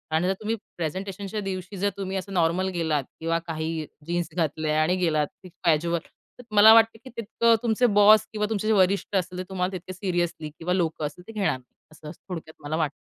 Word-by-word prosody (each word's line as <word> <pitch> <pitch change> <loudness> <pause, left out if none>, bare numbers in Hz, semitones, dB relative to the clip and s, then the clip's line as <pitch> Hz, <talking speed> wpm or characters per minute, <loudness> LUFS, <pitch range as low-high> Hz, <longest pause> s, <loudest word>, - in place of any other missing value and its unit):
आणि 165 +3 +2
जर 190 - +2
तुम्ही 220 +1 -1 0.2
प्रेझेंटेशनच्या 195 +5 -4
दिवशी 190 0 -5
जर 200 +2 +1
तुम्ही 195 -1 -3
असं 190 +1 -6
नॉर्मल 175 +1 +2
गेलात 160 -4 0 0.2
किंवा 165 +1 0
काही 160 -1 -3 0.2
जीन्स 175 -1 -1
घातल्या 155 -2 0
आणि 170 +4 +2
गेलात 155 -5 +1 0.4
कॅज्युअल 170 0 +2 0.4
तर - - -10
मला 215 +2 +9
वाटतं 225 0 +5
की 260 - -10
तितकं 230 +1 +3
तुमचे 235 +1 +2
बॉस 215 +1 +7
किंवा 210 -1 0
तुमचे 215 -1 -1
जे 220 - +4
वरिष्ठ 195 +1 +2
असतील 180 -1 -1
ते - - -2
तुम्हाला 185 -1 -1
तितके 185 0 -6
सीरियसली 175 -4 -2
किंवा 165 +4 -3
लोकं 165 -4 0
असतील 150 +5 -8
ते - - -8
घेणार 205 -3 +1
नाही, 130 -1 -25 0.2
असं 155 -1 -10 0.2
थोडक्यात 160 -3 -7
मला 150 +2 -2
वाटतं. 155 -3 0
180 Hz, 200 wpm, -25 LUFS, 160-200 Hz, 0.4 s, मला